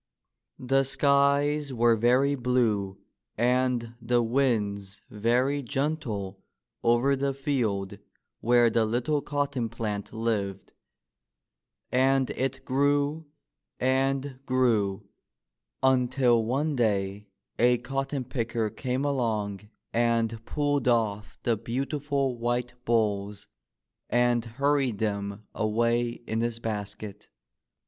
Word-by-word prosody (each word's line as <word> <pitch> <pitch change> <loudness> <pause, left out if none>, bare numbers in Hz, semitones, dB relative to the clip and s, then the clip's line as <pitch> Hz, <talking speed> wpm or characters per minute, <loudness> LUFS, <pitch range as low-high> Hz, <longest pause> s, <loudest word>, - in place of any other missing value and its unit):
The 135 +2 +2
skies 140 +1 +2
were 120 0 +4
very 125 +5 +3
blue 115 -7 0 0.4
and 125 -1 +1
the 120 +1 +2
winds 105 -6 0
very 125 +7 +1
gentle 120 -8 -3 0.4
over 120 +4 +3
the 135 0 -1
field 115 -9 -1 0.4
where 120 0 +4
the 115 - +3
little 120 +7 0
cotton 140 -5 -2
plant 105 -3 -4
lived; 105 -4 -2 1.2
and 130 +1 +3
it 135 0 -3
grew 145 +3 +1 0.5
and 135 +1 0
grew 110 -6 +1 0.8
until 125 -2 +3
one 140 +6 0
day 100 -3 0 0.3
a 125 +1 +5
cotton 135 +2 -3
picker 115 -3 -2
came 130 +3 -2
along 105 -7 -1 0.2
and 115 -1 +1
pulled 145 -3 0
off 110 -3 0
the 115 - +2
beautiful 135 +2 -2
white 120 +1 -1
bolls 105 -3 0 0.6
and 120 -1 +2
hurried 135 0 0
them 100 -1 -3
away 115 +2 0
in 110 +1 -1
his 115 -1 -1
basket. 105 -2 -6
120 Hz, 100 wpm, -27 LUFS, 110-135 Hz, 1.2 s, a